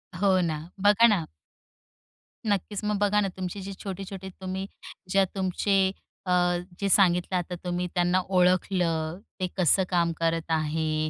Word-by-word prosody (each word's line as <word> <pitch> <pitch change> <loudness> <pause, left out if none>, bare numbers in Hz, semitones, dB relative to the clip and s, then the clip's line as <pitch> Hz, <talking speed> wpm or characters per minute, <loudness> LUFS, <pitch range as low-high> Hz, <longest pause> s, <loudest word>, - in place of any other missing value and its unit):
हो 190 0 +3
ना. 160 -3 -1 0.2
बघा 205 +4 +6
ना 195 -7 +1 1.2
नक्कीच, 205 0 -1
मग 210 0 0
बघा 205 0 +3
ना 195 - 0
तुमची 185 +1 -4
जी 195 +1 -6
छोटे-छोटे 195 -1 -6
तुम्ही 190 +1 -4 0.4
ज्या 195 +1 +4
तुमचे 190 +1 +1 0.3
अ, 180 - -2 0.5
जे 200 - 0
सांगितलं 180 -1 +3
आता 180 0 -3
तुम्ही 180 0 -1
त्यांना 180 +1 +2 0.2
ओळखलं 180 -2 +1 0.2
ते 185 - 0
कसं 185 +1 +4
काम 170 -2 +2
करत 165 0 -1
आहे. 155 0 0
185 Hz, 140 wpm, -26 LUFS, 175-195 Hz, 1.2 s, बघा